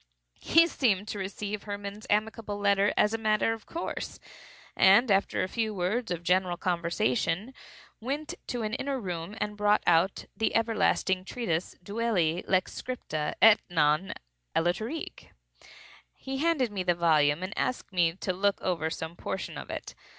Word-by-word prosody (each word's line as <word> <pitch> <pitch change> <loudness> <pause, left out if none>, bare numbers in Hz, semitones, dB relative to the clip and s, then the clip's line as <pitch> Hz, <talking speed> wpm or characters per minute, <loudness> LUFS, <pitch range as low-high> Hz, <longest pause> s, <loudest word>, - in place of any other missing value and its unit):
He 330 +1 +5
seemed 215 - +1
to 205 - -4
receive 200 +2 -4
Hermann's 205 0 -7
amicable 210 0 -1
letter 200 0 +3
as 210 - +3
a 225 - -1
matter 215 0 +2
of 225 -2 -10
course, 335 - -5 0.6
and 205 +5 +6
after 195 0 +2
a - - -1
few 220 +1 -2
words 205 +7 -1
of 175 -1 -3
general 180 0 +2
conversation, 180 +4 0 0.5
went 290 +7 -3
to 245 -2 -3
an 215 0 -3
inner 275 +1 -2
room 180 -1 -5
and 210 0 -2
brought 210 0 +2
out 175 +3 +3
the 220 - 0
everlasting 220 -4 +1
treatise 185 -6 -3
"Duelli 195 -6 0
Lex 185 -1 0
scripta, 155 -12 -3
et 220 -1 +8
non; 155 +2 +2 0.4
aliterque." 215 - -2 0.9
He 270 0 -5
handed 290 -6 +1
me 200 -2 -3
the 180 -1 +1
volume 155 -1 +3
and 190 +3 -5
asked 250 -5 -2
me 170 -2 +3
to 185 +1 -3
look 200 +2 +1
over 165 -3 -1
some 160 +1 -5
portion 95 - -5
of - - -8
it. - - -6
200 Hz, 155 wpm, -28 LUFS, 175-225 Hz, 0.9 s, et